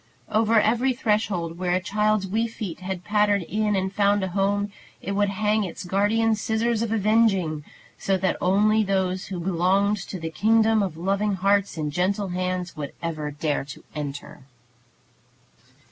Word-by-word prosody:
Over 220 +1 +4
every 240 +5 +2
threshold 200 -7 -1
where 180 -1 0
a - - +2
child's 210 +2 0
wee 220 +5 0
feet 210 -6 -6
had 185 -1 -5
pattered 205 -1 +2
in 210 +3 0
and 190 0 -1
found 200 0 +2
a 190 - -2
home, 200 +2 0 0.3
it 195 - -5
would 205 0 +1
hang 210 +2 +1
its 180 - -6
guardian 205 +5 +2
Scissors 220 +1 0
of 230 -2 -2
Avenging, 205 -8 +2 0.4
so 195 -1 +1
that 190 0 0
only 210 +4 +3
those 190 -2 -1
who 185 -3 -5
belong 190 +3 +2
to 195 -2 -5
the 160 0 -5
kingdom 220 +3 +3
of 185 -5 -3
loving 195 +3 0
hearts 200 0 +1
and 150 -1 -2
gentle 190 +5 0
hands 180 0 -3
would 145 -2 -6
ever 155 -3 -3
dare 150 0 -2
to 140 - -10
enter. 145 -1 -6
195 Hz, 160 wpm, -24 LUFS, 180-215 Hz, 0.4 s, Over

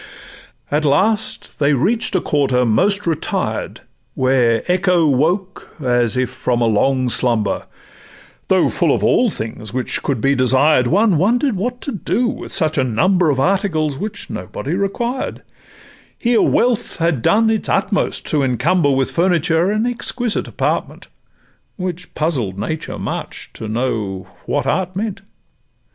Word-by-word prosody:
At 150 +2 +1
last 205 +10 0
they 145 0 +3
reach'd 210 - +1
a 185 - +2
quarter 135 -4 +1
most 200 - +2
retired, 165 -3 -2 0.3
Where 125 -3 +2
echo 180 -2 +2
woke 175 +8 0
as 120 -3 +1
if 130 -1 0
from 120 -1 -1
a 120 - +2
long 130 +4 +2
slumber; 115 -4 +1 0.8
Though - - +3
full - - +1
of - - -3
all - - +3
things 110 -1 -6
which 130 -1 -2
could 140 -5 -1
be 135 +4 +2
desired, 130 +1 +3
One 195 - +3
wonder'd 240 - +2
what 245 +6 -3
to 280 - -4
do 235 +3 -1
with 240 +1 -4
such 160 -4 +1
a - - +3
number 175 - +2
Of 135 -3 +1
articles 160 -3 +1
which 205 +1 -5
nobody 130 - -5
required; 235 +7 -2 0.7
Here 235 -1 +2
wealth 245 -2 +1
had 165 -7 0
done 220 - +3
its 220 - -2
utmost 195 0 0
to 150 - +2
encumber 145 +5 +2
With 135 -1 +1
furniture 170 0 +2
an 215 +2 0
exquisite 245 -1 -2
apartment, - - -3 0.7
Which 180 -1 -5
puzzled 130 - -1
Nature 155 +10 -4
much - - -6
to 110 - -7
know 110 -5 -2 0.2
what - - 0
Art 185 0 -1
meant. 200 -1 -3
160 Hz, 145 wpm, -18 LUFS, 130-195 Hz, 0.8 s, they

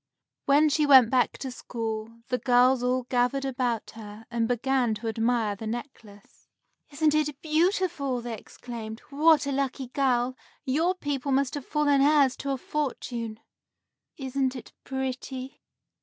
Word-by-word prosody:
When 290 +2 +5
she 300 0 +2
went 260 -5 +8
back 255 -2 +2
to 265 - -5
school, 230 -1 -5
the 250 -1 0
girls 250 0 +4
all 250 +1 +1
gathered 250 +2 0
about 245 -4 -2
her 215 0 -11
and 230 -1 0
began 245 -1 +1
to 230 - -6
admire 225 -1 0
the 220 +2 -7
necklace. 220 -4 -9 0.4
"Isn't 300 +1 +1
it 300 -2 0
beautiful!" 315 -5 0
they 235 -1 -5
exclaimed. 225 0 -8
"What 305 +1 +4
a 280 - -2
lucky 270 -2 -2
girl! 255 -2 +1 0.3
Your 320 +7 +1
people 285 -5 -3
must 270 0 +1
have 290 -3 -6
fallen 290 -2 +2
heirs 285 -2 +4
to 280 - -5
a 270 - 0
fortune!" 240 -6 -4 0.8
"Isn't 265 -1 -1
it 250 - -10
pretty!" 265 0 -5
260 Hz, 145 wpm, -27 LUFS, 235-280 Hz, 0.8 s, went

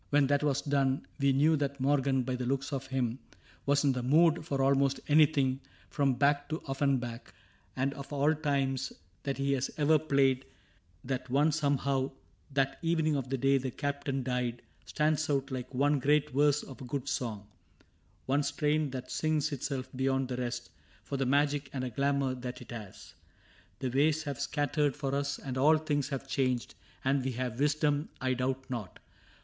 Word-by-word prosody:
When 145 -1 +4
that 140 +1 +2
was 145 -2 +1
done 140 -2 +1
We 140 0 +4
knew 150 +4 +4
that 140 -1 -2
Morgan, 135 -1 +2
by 125 +1 -2
the 125 -1 -3
looks 135 +2 -1
of 135 -1 -3
him, 130 -2 -1 0.5
Was 140 +1 +3
in 140 - +4
the 125 -1 -2
mood 160 +6 +4
for 140 -4 0
almost 135 0 +3
anything 145 -3 +4 0.3
From 140 -3 +2
Bach 145 +2 +2
to 160 +1 -3
Offenbach; 135 -4 -1 0.2
— - - -35
and 135 +2 0
of 140 0 -9
all 145 +2 +3
times 140 -4 -1 0.3
That 140 -1 -3
he 140 0 +1
has 135 0 -1
ever 155 +1 +4
played, 135 -3 +2 0.6
that 130 0 -3
one 145 +5 +3
somehow 140 -3 0 0.2
— - - -33
That 135 -1 +1
evening 160 -2 +1
of 135 -2 -3
the 135 - 0
day 135 +2 +3
the 130 0 -3
Captain 140 0 -2
died 125 -1 -2
— - - -34
Stands 155 0 +1
out 140 -1 0
like 125 -1 -4
one 140 +2 +2
great 150 +2 +2
verse 145 +2 +3
of 135 -3 -11
a - - -6
good 135 +1 -4
song, 115 -8 -3 0.8
One 140 +2 +2
strain 150 +1 0
that 130 -1 -6
sings 155 -2 0
itself 135 -1 -3
beyond 135 0 0
the 125 - -3
rest 120 -1 -4 0.3
For - - -5
the 135 -1 0
magic 145 +1 +2
and 130 -2 -2
a 125 - -3
glamour 140 +1 +1
that 125 -1 -6
it 120 - -11
has. 110 -5 -9 0.6
The 130 -1 -2
ways 155 +4 +2
have 140 -4 -4
scattered 145 -1 0
for 140 -2 -3
us, 140 0 -1
and 130 -2 -4
all 155 +4 +6
things 145 -2 -1
Have 135 -2 -4
changed; 130 -3 0 0.3
and 135 0 +2
we 130 0 -2
have 125 0 -3
wisdom, 145 0 +1
I 130 0 +1
doubt 130 +1 -2
not. 115 -8 -5
140 Hz, 190 wpm, -31 LUFS, 130-145 Hz, 0.8 s, all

